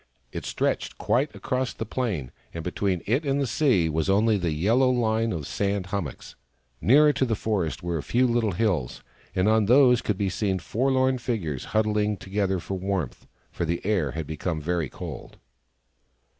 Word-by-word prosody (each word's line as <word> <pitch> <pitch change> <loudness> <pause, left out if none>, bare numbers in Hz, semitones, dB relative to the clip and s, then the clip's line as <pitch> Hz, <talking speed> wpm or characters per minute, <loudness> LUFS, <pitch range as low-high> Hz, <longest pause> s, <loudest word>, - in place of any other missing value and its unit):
It - - -6
stretched - - -1
quite 140 +5 0
across 130 -1 -2
the 110 - -5
plain, 105 - -3 0.2
and 85 - -4
between 90 0 -1
it 130 +9 +1
and 140 -1 0
the 140 - +1
sea 115 - +2
was 80 +3 -1
only 105 +3 +4
the 90 -4 0
yellow 110 +12 +3
line 115 -2 +1
of 85 - -3
the - - -8
sand 100 +2 -1
hummocks. 85 -10 -4 0.5
Nearer 150 +5 +6
to - - 0
the 120 -4 +1
forest 95 -6 -2
were 85 -2 -1
a - - -3
few 125 - +2
little 115 -4 +1
hills, 85 - -1 0.3
and 95 +2 +2
on 110 -1 +3
these 125 0 +6
could 105 - -1
be 100 - 0
seen 95 0 0
forlorn 130 +7 +1
figures, 95 - -3
huddling 105 -1 +1
together 95 0 -1
for 95 +2 -5
warmth 90 -10 -3
— - - -39
for - - -3
the 85 +1 -1
air 95 -9 +1
had 80 -1 -4
become 80 +2 -3
very 80 -2 -1
cold. - - -8
105 Hz, 185 wpm, -26 LUFS, 85-120 Hz, 0.5 s, Nearer